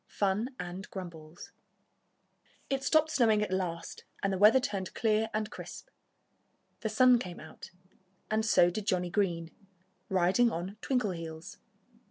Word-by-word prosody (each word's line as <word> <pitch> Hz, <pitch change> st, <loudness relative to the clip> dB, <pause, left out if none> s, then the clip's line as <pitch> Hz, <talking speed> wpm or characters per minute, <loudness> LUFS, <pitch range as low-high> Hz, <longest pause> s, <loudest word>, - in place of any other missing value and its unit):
XIII -, -, -22 dB
FUN 210 Hz, +6 st, 0 dB
AND 180 Hz, +2 st, -6 dB
GRUMBLES 170 Hz, -4 st, -9 dB, 1.2 s
It 270 Hz, 0 st, 0 dB
stopped 310 Hz, +2 st, +3 dB
snowing 220 Hz, -4 st, +3 dB
at 200 Hz, -, -3 dB
last 180 Hz, -3 st, -3 dB, 0.2 s
and 195 Hz, 0 st, +1 dB
the 190 Hz, -, -2 dB
weather 215 Hz, +5 st, +7 dB
turned 200 Hz, -6 st, -4 dB
clear 220 Hz, 0 st, +1 dB
and 215 Hz, 0 st, -2 dB
crisp. -, -, -9 dB, 0.9 s
The 220 Hz, -, -2 dB
sun 250 Hz, +3 st, +5 dB
came 180 Hz, -6 st, -7 dB
out. 155 Hz, -, -11 dB, 0.6 s
And 220 Hz, 0 st, +2 dB
so 175 Hz, -5 st, +4 dB
did 205 Hz, +3 st, -5 dB
Johnnie 180 Hz, -1 st, 0 dB
Green, 170 Hz, -5 st, 0 dB, 0.6 s
riding 190 Hz, +6 st, +3 dB
on 185 Hz, +5 st, -5 dB
Twinkleheels. 170 Hz, -10 st, -3 dB
195 Hz, 140 wpm, -30 LUFS, 175-220 Hz, 1.2 s, weather